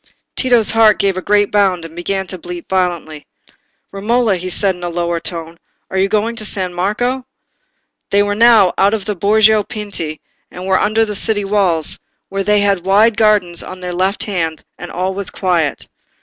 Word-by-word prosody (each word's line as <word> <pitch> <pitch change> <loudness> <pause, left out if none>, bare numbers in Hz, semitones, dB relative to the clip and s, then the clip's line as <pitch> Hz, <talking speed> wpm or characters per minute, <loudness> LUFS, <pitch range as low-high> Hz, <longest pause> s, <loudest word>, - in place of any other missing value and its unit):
Tito's 240 -4 +3
heart 225 -2 +5
gave 195 -1 +1
a 185 - -3
great 205 +1 +2
bound, 190 -5 +1
and 165 0 -11
began 190 +2 -2
to 185 0 -8
beat 175 0 -8
violently. 175 -5 -2 0.6
"Romola," 215 +2 +1
he 185 +1 -5
said, 195 +1 +2
in 180 - -13
a 175 - -2
lower 170 0 -2
tone, 165 0 -5 0.3
"are 190 - -2
you 195 +1 +2
going 220 +3 0
to 215 - -3
San 185 -3 -2
Marco?" 245 +8 -1 0.9
They 200 0 +3
were 205 0 -1
now 220 -4 +5
out 200 +3 +4
of 205 -3 -6
the 210 - -2
Borgo 215 +3 +4
Pinti 200 -8 -5 0.3
and 180 +1 -9
were 190 0 +2
under 220 +2 +2
the 210 - -5
city 205 0 0
walls, 190 -6 +1 0.3
where 195 0 -2
they 210 0 +3
had 200 -3 +1
wide 205 +4 +4
gardens 210 -6 +2
on 185 - -9
their 180 -1 -5
left 190 +3 0
hand, 165 -6 -3
and 175 - -9
all 185 +2 -2
was 200 0 -3
quiet. 170 -6 -1
195 Hz, 190 wpm, -16 LUFS, 180-210 Hz, 0.9 s, heart